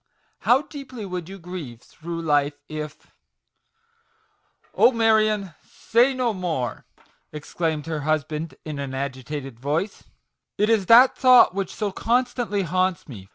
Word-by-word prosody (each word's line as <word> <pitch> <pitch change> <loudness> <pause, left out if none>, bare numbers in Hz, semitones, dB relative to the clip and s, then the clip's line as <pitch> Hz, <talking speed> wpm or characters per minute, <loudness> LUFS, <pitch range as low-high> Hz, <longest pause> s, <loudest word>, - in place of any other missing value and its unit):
How 260 +4 +3
deeply 275 -5 -9
you 200 - -6
would 180 +1 -6
grieve 165 -10 -7
through 165 +4 -7
life 145 -2 +1
if 155 -1 -8 0.4
" 460 0 -43
" - - -40
Oh, - - +5
Marion, 215 -5 +2
say 245 +4 +1
no 250 -3 0
more! 160 - -3 0.2
" - - -39
exclaimed 155 0 -3
her 160 -2 -3
husband 155 +1 -2
in 150 -2 -5
an 135 -1 -5
agitated 135 -1 -5
voice, 155 - -3 0.3
" - - -59
it 210 +2 +2
is 205 -5 +2
that 245 +3 +7
thought 255 -6 +6
which 195 -1 -3
so 210 -2 -2
constantly 235 -2 0
haunts 185 +1 -1
me. 100 -9 -10
180 Hz, 150 wpm, -23 LUFS, 150-225 Hz, 0.4 s, that